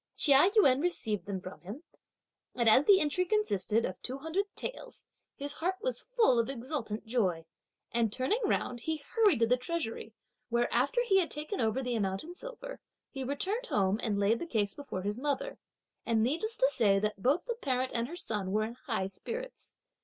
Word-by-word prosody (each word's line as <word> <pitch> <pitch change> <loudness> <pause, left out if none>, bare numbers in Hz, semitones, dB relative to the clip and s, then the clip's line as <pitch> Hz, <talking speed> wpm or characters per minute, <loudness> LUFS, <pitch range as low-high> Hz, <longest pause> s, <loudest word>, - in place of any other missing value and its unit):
Chia 290 +4 +6
Yün 275 -11 +5
received 215 - -1
them 195 -2 -3
from 185 +1 -10
him, 210 - -8 0.7
and 235 -2 +1
as 255 +6 +6
the 390 -2 +7
entry 300 +4 +1
consisted 230 - +1
of 185 - -6
two 260 +2 -4
hundred 320 +8 -1
taels, - - -6 0.3
his 285 +1 -4
heart 360 +5 -1
was - - -3
full 260 - +5
of 230 - 0
exultant 245 -4 -4
joy; 190 -9 0 0.5
and 230 -2 +1
turning 260 - 0
round, 255 - 0
he 320 +6 -2
hurried 425 -8 +4
to - - +6
the 250 +2 +3
treasury, 255 -4 -4 0.4
where 240 0 +1
after 280 - +2
he 390 -5 +4
had 345 - 0
taken 305 +5 -3
over 225 +4 0
the 250 -1 -2
amount 195 -3 -1
in 340 +3 -9
silver, - - -8 0.3
he 270 -1 -5
returned 390 - -2
home 195 - +1
and 210 -3 -1
laid 205 +3 +2
the 340 - -5
case 210 -8 0
before 280 -10 -6
his 205 +3 -2
mother, 295 - -2 0.4
and 225 -2 +2
needless 340 - 0
to 265 - +4
say, 205 -7 +5
that 210 0 -2
both 285 - +2
the 485 - -1
parent 260 - -1
and 235 0 -1
her 335 - -7
son 210 - -2
were 215 +2 +2
in 225 +2 -4
high 225 -5 -3
spirits. 465 - -6
255 Hz, 195 wpm, -31 LUFS, 220-350 Hz, 0.7 s, the